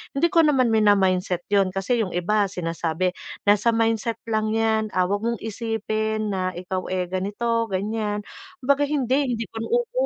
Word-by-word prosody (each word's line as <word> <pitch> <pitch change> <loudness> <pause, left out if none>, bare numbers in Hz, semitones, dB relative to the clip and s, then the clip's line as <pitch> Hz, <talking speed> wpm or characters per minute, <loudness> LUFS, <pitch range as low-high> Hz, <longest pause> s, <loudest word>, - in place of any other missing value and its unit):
hindi 335 +6 +2
ko 340 - +4
naman 270 -7 +4
mina-mindset 190 -4 +2
'yon 200 -2 +4
kasi 195 +6 -1
'yong 190 -5 -2
iba 200 +3 +1
sinasabi, 170 0 -2 0.3
"Nasa 210 +3 +3
mindset 225 0 +1 0.2
lang 215 0 +1
'yan. 220 -1 +1
Ah, 180 0 +1
huwag 205 +2 -1
mong 235 -2 -1
isipin 220 -1 -2
na 185 -1 -1
ikaw, 185 +1 -4
eh, 180 -1 -2
ganito, 210 +5 -1
ganyan." 210 +1 -2 0.4
Kumbaga, 280 +2 +3
hindi, 275 -2 +1
hindi 230 0 -3
ko - - -10
na 225 - -3
oo. 485 +1 +1
215 Hz, 165 wpm, -24 LUFS, 190-230 Hz, 0.4 s, ko